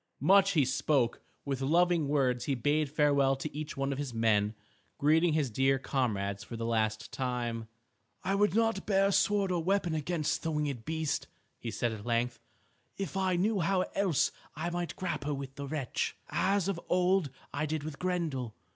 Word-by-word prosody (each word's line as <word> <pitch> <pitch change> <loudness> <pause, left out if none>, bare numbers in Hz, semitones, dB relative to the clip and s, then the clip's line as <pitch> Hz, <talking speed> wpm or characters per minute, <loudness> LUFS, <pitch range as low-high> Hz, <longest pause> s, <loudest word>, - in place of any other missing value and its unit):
Much 195 +5 +5
he 150 -5 +4
spoke. 130 -1 +1 0.2
With 135 -2 -2
loving 170 +2 +3
words 130 -4 +1
he 140 - 0
bade 145 +4 +1
farewell 140 -2 +3
to 140 +2 -6
each 150 0 -5
one 135 0 0
of 135 - -3
his 135 -5 -4
men, 110 -2 +2 0.4
greeting 160 +3 +3
his 150 -6 +1
dear 135 +4 +3
comrades 105 -8 -1
for 115 - -7
the 115 - -3
last 110 -1 0
time. 120 -3 -2 0.6
"I 190 +2 0
would 200 -2 +2
not 225 -3 +1
bear 195 -1 +4
a - - +1
sword 200 -1 +2
or 175 -2 0
weapon 185 -2 +1
against 155 0 -1
the 165 - -2
winged 145 -6 -2
beast," 160 -1 -1 0.3
he 120 - -5
said 120 +1 -1
at 110 -2 -7
length, 120 +1 0 0.6
"if 195 0 -4
I 190 -1 +1
knew 200 +4 +1
how 185 +2 +2
else 190 -7 +2 0.2
I 165 +3 -3
might 175 0 -3
grapple 150 -5 -2
with 135 -1 -6
the 140 0 -6
wretch, 135 -4 -2
as 195 -1 +1
of 185 -4 -2
old 180 -2 +3 0.2
I 155 +2 -1
did 155 -1 -2
with 155 -1 -6
Grendel. 160 -11 -2
150 Hz, 180 wpm, -31 LUFS, 130-175 Hz, 0.6 s, Much